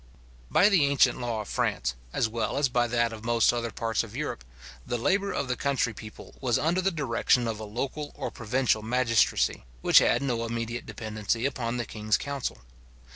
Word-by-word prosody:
By 200 - +5
the 190 -8 +4
ancient 140 -2 +3
law 115 -3 -2
of 105 - -9
France, - - -1 0.2
as - - +1
well 115 +4 -2
as 140 -2 +2
by 120 0 +2
that 120 -1 +1
of 110 -1 -9
most 120 0 +3
other 120 -1 -2
parts 115 +1 -1
of 115 0 -10
Europe, 145 - -4 0.4
the 120 - -2
labour 195 - +1
of 140 - -2
the 125 - -1
country 135 -4 0
people 105 0 -11
was 125 -3 +2
under 170 +4 +1
the 190 - +2
direction 125 -6 +1
of 110 -1 -3
a 110 - -5
local 135 +7 -4
or - - -4
provincial 120 -1 0
magistracy, 115 - +2 0.2
which - - +7
had - - +2
no 120 -4 -1
immediate 115 +1 -4
dependency 110 +1 -2
upon 125 -3 -2
the 120 - -2
king's 105 -1 0
council. 140 -2 -4
120 Hz, 190 wpm, -27 LUFS, 115-135 Hz, 0.4 s, which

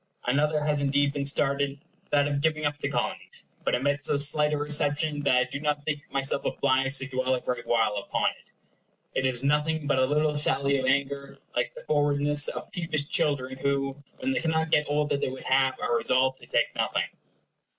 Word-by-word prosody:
Another 150 +4 +1
has 150 -1 +1
indeed 140 0 +2
been 140 -1 -2
started, 140 0 +1 0.3
that 145 0 +3
of 145 -1 -1
giving 155 0 +1
up 145 0 0
the - - -2
Colonies; - - -3
but - - +1
it 125 - -2
met 145 0 0
so 140 - +1
slight 150 +1 +2
a 150 - +1
reception 145 0 0
that 140 -3 +3
I 125 - +4
do 140 - -6
not 145 -1 -1
think 145 -2 -2
myself 135 0 0
obliged 135 +1 +1
to 130 - -3
dwell 130 -1 0
a - - -2
great 125 -1 -4
while 110 -3 +2
upon 100 - 0
it. - - -19 0.6
It 130 - +1
is 125 -1 -2
nothing 150 +2 +1
but 140 -2 +2
a 130 - +4
little 150 +2 +1
sally 140 -1 +1
of 130 -1 -1
anger, 140 0 0 0.2
like 120 - -1
the - - -10
forwardness 145 0 +2
of - - -5
peevish 155 -4 -2
children 130 -3 +1
who, 135 -1 0 0.2
when 265 +1 -1
they 265 - +1
cannot 160 -1 0
get 150 - +3
all 150 +1 +1
they 140 -2 -1
would 130 0 -8
have, 135 0 +2
are 120 - +1
resolved 130 +2 +2
to - - -13
take - - +1
nothing. - - 0
140 Hz, 205 wpm, -27 LUFS, 135-150 Hz, 0.6 s, I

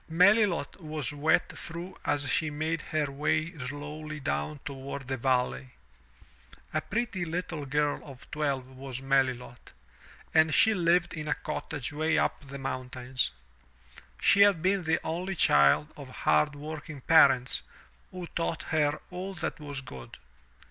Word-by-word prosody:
Melilot 185 0 +3
was 155 -5 -3
wet 155 +4 +2
through 175 +3 -6
as 145 -1 0
she 155 +5 +1
made 155 +2 -2
her 150 -3 -1
way 155 +4 0
slowly 150 +3 -6
down 75 - -2
toward 135 -1 -6
the 130 - -1
valley. 120 - 0 1.0
A - - +1
pretty 225 -4 -2
little 165 -3 -3
girl 145 +1 0
of 135 -3 -12
twelve 140 -4 -1
was 130 0 -7
Melilot, 130 -3 -1 0.6
and 160 -2 +5
she 220 - +6
lived 175 -2 +2
in 155 -3 -5
a - - +1
cottage 145 -3 -4
way 155 +1 +1
up 140 - 0
the 140 +1 -7
mountains. 130 - -2 0.9
She 200 - +5
had 200 -5 +5
been 190 -1 +2
the 160 +1 +2
only 180 +4 -3
child 70 - +4
of 140 -3 -10
hard 150 +2 +2
working 150 0 -7
parents 135 -5 +5 0.5
who 180 -1 -7
taught 165 -1 -3
her 150 -1 +2
all 185 +2 -5
that 165 +1 -3
was 145 -2 -5
good. 65 - -10
150 Hz, 140 wpm, -29 LUFS, 135-165 Hz, 1.0 s, she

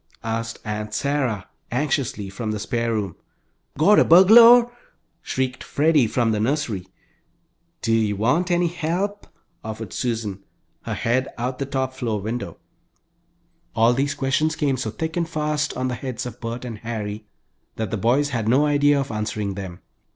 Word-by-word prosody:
asked 115 0 -3
Aunt 105 0 -4
Sarah, 135 -8 -1 0.2
anxiously, 130 -5 -1
from 105 +3 -5
the 110 - -1
spare 115 +2 -1
room. 105 -5 -2 0.6
"Got 185 +9 +6
a - - +6
burgulor?" 230 +7 +8 0.5
shrieked 130 -4 -2
Freddie, 150 -4 +3
from 115 0 +1
the 105 - 0
nursery. 115 -6 -1 1.0
"Do 115 - +1
you 110 -2 +2
want 145 - +1
any 175 0 +2
help?" 175 +5 -3 0.4
offered 110 -2 -6
Susan, 110 -5 -3 0.4
her - - -3
head 130 +3 0
out 125 +2 -1
of - - -19
the 140 - -2
top 130 -1 -2
floor 115 -5 -2
window. 115 +5 -5 1.2
All 115 +1 +4
these 140 +3 0
questions 150 +4 0
came 140 -3 +1
so 115 -3 -3
thick 160 +8 -4
and 170 -2 -1
fast 150 -2 -1
on 130 0 -1
the 125 - -2
heads 125 0 -5
of 125 - -8
Bert 120 +1 -5
and 115 -3 -6
Harry 105 -2 -5 0.5
that 110 -3 -3
the - - 0
boys 125 +8 +2
had 115 -5 -2
no 130 +6 +4
idea 145 -1 +3
of 135 -2 -3
answering 105 -2 -3
them. 95 -2 -7
125 Hz, 165 wpm, -23 LUFS, 110-145 Hz, 1.2 s, burgulor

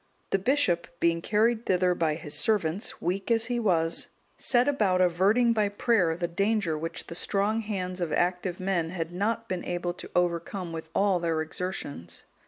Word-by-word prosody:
The 195 - +2
bishop, 195 -6 +1
being 170 0 +2
carried 220 +4 +1
thither 180 -1 +3
by 160 -3 0
his 150 -2 -7
servants, 185 +4 0
weak 185 +5 -1
as 225 -1 +3
he 240 0 -1
was, 165 -7 +1 0.3
set 245 0 +2
about 205 -10 +2
averting 195 +7 +3
by 210 -2 +1
prayer 200 -5 +2
the 175 -1 -1
danger 200 -1 0
which 165 +2 -5
the - - -8
strong 205 +5 0
hands 185 -4 -4
of 170 -3 -1
active 180 +1 0
men 185 -3 0
had 165 -2 -4
not 225 +5 -1
been 185 -4 -3
able 175 0 -2
to - - -10
overcome 175 0 -1
with 160 0 -6
all 195 -2 +3
their 165 -2 0
exertions. 155 - -6
180 Hz, 175 wpm, -28 LUFS, 170-210 Hz, 0.3 s, thither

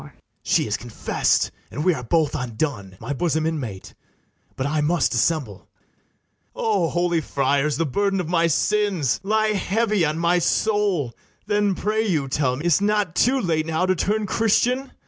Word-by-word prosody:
BARABAS. - - -15 0.2
She - - +1
has - - -1
confess'd, - - 0 0.2
and 150 - -4
we 180 - +4
are 135 - -5
both 155 +4 +1
undone, 115 -6 -3
My 125 +5 -4
bosom 160 +1 0
inmate! 130 -12 -4 0.6
but 130 - -3
I 150 +1 0
must 165 +3 +1
dissemble. 120 - 0
[Aside - - -28
to - - -26
ITHAMORE.] 200 -6 +1
O - - -4
holy 175 -1 0
friars, 140 +1 0
the 165 - +1
burden 195 +7 0
of 180 - -3
my 170 0 +2
sins 185 - +1
Lie 215 +2 +1
heavy 210 0 +1
on 155 0 0
my 170 +1 +2
soul! 190 - 0 0.3
then, 205 -2 +1
pray 215 +3 0
you, 160 -10 0
tell 130 -2 0
me, 150 +6 -6
Is't 175 +2 +3
not 205 -4 +1
too 260 +8 +2
late 160 -6 0
now 165 +2 0
to 185 - +2
turn 210 +5 0
Christian? 240 +6 +1
170 Hz, 180 wpm, -22 LUFS, 145-205 Hz, 0.6 s, we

